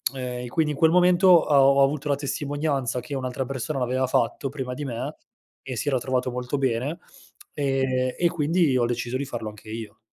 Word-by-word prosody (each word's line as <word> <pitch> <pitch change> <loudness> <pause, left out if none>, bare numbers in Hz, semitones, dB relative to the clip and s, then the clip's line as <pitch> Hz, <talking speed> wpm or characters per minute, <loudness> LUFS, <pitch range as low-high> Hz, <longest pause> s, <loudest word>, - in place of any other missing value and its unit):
Ehm, 125 -1 -4
e - - -6
quindi 150 +4 0
in 145 - -5
quel 160 - +5
momento 180 +1 +4
ho 170 -5 +6 0.2
ho 140 0 +5
avuto 145 +1 0
la 140 - +3
testimonianza 140 -2 -2
che 125 +4 -8
un'altra 130 0 -3
persona 135 +2 -4
l'aveva 130 +1 0
fatto 130 +3 0
prima 130 -3 -5
di 145 +2 -5
me 130 +4 -4 0.5
e 130 - -6
si 130 - -4
era 130 -3 +2
trovato 125 0 -1
molto 125 +3 -3
bene. 135 +4 -1 0.6
Ehm, 130 -3 0
e 175 - +3
quindi 165 -2 +1
ho 120 - +2
deciso 120 +1 -2
di 140 - -3
farlo 120 -5 -5
anche 105 +1 -13
io. 110 -1 -7
135 Hz, 200 wpm, -25 LUFS, 125-145 Hz, 0.6 s, ho